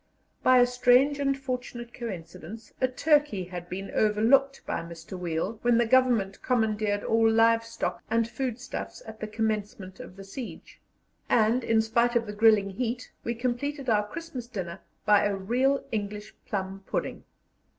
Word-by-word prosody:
By 255 0 +5
a 245 - +7
strange 250 +3 +4
and 275 -1 +1
fortunate 250 -3 -5
coincidence, 205 0 -8
a 255 - +4
turkey 290 -6 +2
had 175 -1 -8
been 195 +2 -5
overlooked 245 +6 +3
by - - -2
Mr. 170 +2 -9
Weil 180 +4 -3
when 240 -1 +3
the 235 - +3
Government 230 -5 +2
commandeered 215 -4 0
all 225 0 +3
live 225 +1 +4
stock 230 0 -4
and 230 0 +2
food 250 0 -3
stuffs 245 - -6
at 220 0 -10
the 215 - -4
commencement 210 -2 -3
of 185 - -10
the 195 - -10
siege, 225 +5 -9 0.5
and, 230 +2 +3
in 225 -1 +3
spite 235 +2 +1
of 235 -1 +2
the 210 - -6
grilling 210 -2 +4
heat, 245 +4 -3
we 235 - -2
completed 255 +3 -2
our 210 -1 +2
Christmas 290 -2 -7
dinner 190 -6 -5 0.3
by 210 -1 +5
a 205 -1 +1
real 250 +8 +1
English 210 -1 -4
plum 195 -1 -4
pudding. - - -3
225 Hz, 160 wpm, -27 LUFS, 205-250 Hz, 0.5 s, a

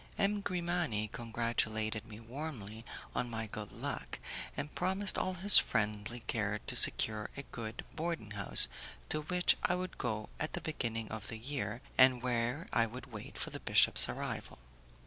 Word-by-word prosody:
M. 205 0 0
Grimani 175 - -2
congratulated 110 -1 -2
me 110 -1 -10
warmly 115 -3 -8 0.3
on 120 - -2
my 115 -1 -4
good 105 -1 -8
luck, - - -5 0.4
and 150 - -5
promised 190 +2 0
all 185 0 -1
his 195 +3 +10
friendly 105 +3 -2
care - - -2
to - - -2
secure 110 -1 +4
a 140 - -6
good 115 -1 -7
boarding 160 -10 -4
house, 100 -2 +9 0.4
to 155 - -2
which 180 +4 +2
I 180 - +1
would 185 0 -6
go 110 -3 -3
at 155 - -3
the - - -3
beginning 115 -7 -4
of 110 -2 -6
the 115 - -6
year, 120 -2 -5 0.2
and 130 -1 +6
where 125 +5 -2
I 115 -1 +2
would 125 +3 -10
wait 105 -2 -9
for - - -3
the - - -7
bishop's - - +4
arrival. - - -6
120 Hz, 165 wpm, -33 LUFS, 110-155 Hz, 0.4 s, his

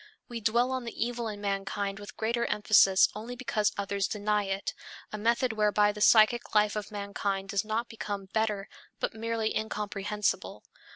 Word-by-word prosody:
We 235 -1 -6
dwell 235 +4 +2
on 260 -1 -2
the 230 0 -2
evil 240 -1 -3
in 205 -1 -6
mankind 195 0 -2
with 205 0 -10
greater 235 +2 0
emphasis 200 -2 +5
only 230 +4 -6
because 215 -4 0
others 200 0 -1
deny 210 0 0
it, 195 0 -3 0.4
a - - -2
method 235 +2 +1
whereby 210 -1 +3
the 210 0 -9
psychic 220 +2 +5
life 210 0 +4
of 210 -1 -4
mankind 200 -1 -3
does 200 -2 0
not 220 +2 -2
become 205 -3 -5
better, 210 0 -1 0.3
but - - -1
merely 225 0 -2
incomprehensible. 210 -1 -2
210 Hz, 165 wpm, -29 LUFS, 200-225 Hz, 0.4 s, emphasis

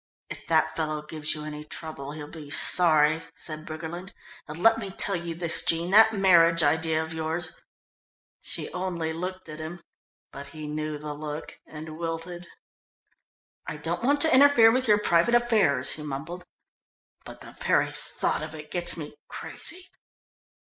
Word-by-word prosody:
"If - - -9
that 160 -1 +2
fellow 155 -2 -3
gives 155 0 -1
you 150 0 -7
any 150 0 -7
trouble 150 -2 -8
he'll 150 -1 -8
be 150 -2 -11
sorry," 155 0 +4
said 155 0 -6
Briggerland. 165 +4 -7 0.3
"And 155 +3 -8
let 225 0 +5
me 200 -3 -5
tell 195 +1 +1
you 170 -1 -4
this, 170 -1 +4
Jean, 170 +2 0
that 220 +2 +7
marriage 170 -5 +4
idea 160 +1 +1
of 160 +1 -8
yours 160 +2 -2 0.5
" - - -91
She - - -3
only 175 -3 -3
looked 185 +2 -6
at 155 0 -9
him, 170 +2 -8 0.5
but 140 +1 -9
he 155 -2 -9
knew 155 0 -4
the 150 0 -6
look 150 +1 -7
and 155 +1 -9
wilted. 170 +1 -5 1.2
"I 150 - -5
don't 165 +3 -3
want 285 +4 +2
to 320 - +6
interfere 260 -4 +6
with 255 +1 0
your 210 -1 +5
private 205 +3 +2
affairs," 225 -11 +2
he 155 - -6
mumbled, 150 +5 -6 0.8
"but - - -11
the - - -11
very - - 0
thought - - -3
of 155 0 -7
it 150 -1 -11
gets 175 -1 +4
me 150 -2 -7
crazy." 365 +2 -5
160 Hz, 165 wpm, -26 LUFS, 155-180 Hz, 1.2 s, that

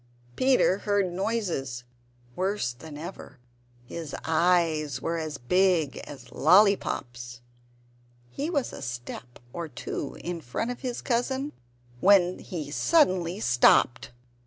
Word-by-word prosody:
Peter 255 -7 +3
heard 205 -4 0
noises 175 - -2 0.5
worse 190 - -1
than 145 +4 -10
ever; 160 -3 -9 0.5
his 160 +3 -6
eyes 160 -4 +2
were 165 +4 -2
as 155 -3 -4
big 175 +2 +2
as 130 -4 -11
lolly 200 +6 +6
pops! 120 -6 -6 0.9
He 290 +4 -3
was 285 -7 -1
a - - -8
step 120 -1 -7 0.2
or 170 -1 -4
two 140 +1 -6
in 175 -1 -4
front 160 - -3
of 245 - -7
his 250 -2 -4
cousin 265 +4 -1 0.5
when 185 +1 +4
he 155 -5 -6
suddenly 185 - +2
stopped. 125 - +4
170 Hz, 120 wpm, -27 LUFS, 140-200 Hz, 0.9 s, lolly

